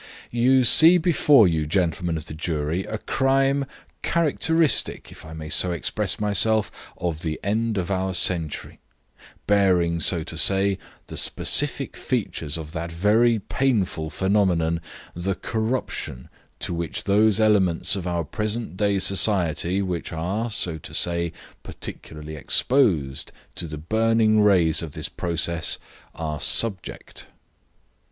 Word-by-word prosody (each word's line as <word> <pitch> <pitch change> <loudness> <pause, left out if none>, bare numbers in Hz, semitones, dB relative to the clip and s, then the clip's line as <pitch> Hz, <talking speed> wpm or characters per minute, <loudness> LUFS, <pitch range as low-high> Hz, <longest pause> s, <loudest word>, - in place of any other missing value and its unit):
"You 125 +2 +3
see 160 +8 +8
before 150 - +5
you, 80 -3 -1
gentlemen 85 -1 0
of 80 - -6
the - - -7
jury, 80 +2 -2
a 110 - -4
crime 135 +3 +1 0.4
characteristic, 160 -2 +1
if - - -13
I 80 - -10
may 80 -1 -7
so 90 - +2
express 85 -5 -1
myself, 105 +1 +2 0.3
of 85 -3 -3
the 80 -2 -3
end 110 +2 -1
of 95 +1 -2
our 95 -1 -1
century; 85 -4 -1 0.7
bearing, 90 -5 +2
so 85 +1 +1
to 80 0 -5
say, 95 +1 +2 0.3
the - - -7
specific - - 0
features 75 0 -3
of 80 -2 -8
that 85 0 -5
very 110 +7 +3
painful 100 -8 -1
phenomenon, 90 -3 +1 0.3
the 90 +3 -2
corruption 110 - -3 0.3
to - - -2
which 85 -1 -4
those 105 +1 +3
elements 100 -6 +2
of 95 -2 -4
our 85 -1 -1
present 110 - -4
day 100 -1 +1
society, 95 -1 +1
which 90 -3 -4
are, 95 +8 -2
so 85 -6 -2
to - - -10
say, 85 -1 0 0.3
particularly 75 0 -8
exposed 75 - +1 0.2
to 85 - -5
the 75 -1 -7
burning 110 +5 +2
rays 90 -6 +3
of 80 -4 -7
this - - -4
process, 85 -1 -2 0.4
are 75 -2 -4
subject." 105 -5 -1
95 Hz, 130 wpm, -23 LUFS, 85-110 Hz, 0.7 s, see